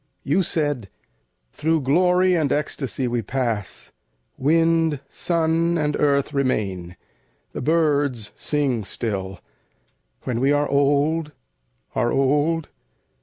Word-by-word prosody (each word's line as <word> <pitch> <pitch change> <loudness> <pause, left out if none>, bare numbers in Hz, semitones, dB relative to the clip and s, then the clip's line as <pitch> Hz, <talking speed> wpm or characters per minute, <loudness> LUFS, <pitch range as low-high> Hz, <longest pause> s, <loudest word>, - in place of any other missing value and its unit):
You 150 +7 +2
said, 145 - -1 0.6
"Through 160 +1 0
glory 180 +6 +3
and 155 -5 +1
ecstasy 135 -4 -1
we 120 -1 -1
pass; 115 -6 -3 0.4
Wind, 165 +1 +2
sun, 165 +2 0
and 150 -2 0
earth 140 0 +1
remain, 100 -10 -1 0.6
the - - -4
birds 145 -7 +1
sing 140 -7 -1
still, 95 -3 -4 0.8
When 120 -2 -2
we 135 +3 +2
are 145 0 +2
old, 145 +3 +1 0.6
are 120 -2 +1
old. 150 +4 +1
145 Hz, 105 wpm, -22 LUFS, 125-160 Hz, 0.8 s, glory